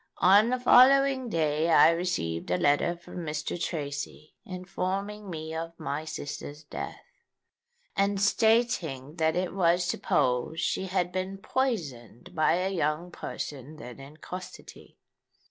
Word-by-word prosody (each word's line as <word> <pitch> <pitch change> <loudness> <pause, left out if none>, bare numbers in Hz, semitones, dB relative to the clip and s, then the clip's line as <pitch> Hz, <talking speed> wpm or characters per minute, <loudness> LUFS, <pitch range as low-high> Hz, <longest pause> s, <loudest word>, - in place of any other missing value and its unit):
"On 205 +5 +6
the 255 0 0
following 260 +1 +5
day 155 -2 +1
I 165 - +7
received 165 - -2
a 90 - +2
letter 145 - +2
from 175 - -12
Mr. 160 0 -4
Tracy 145 -1 -5
informing 195 +3 -4
me 160 -2 -6
of 165 +1 -6
my 150 +3 -3
sister's 145 0 -6
death, - - -7 0.9
and 200 0 +1
stating 195 - +1
that 160 -1 +2
it 180 0 -1
was 175 -1 +2
supposed 125 -3 0
she 190 - -1
had 180 -1 0
been 185 +1 -3
poisoned 180 - -3
by 155 -3 +3
a 185 +2 0
young 165 +1 -1
person 145 -3 -6
then 125 -4 -10
in 140 +3 -12
custody. 185 +3 -10
170 Hz, 130 wpm, -28 LUFS, 150-195 Hz, 0.9 s, I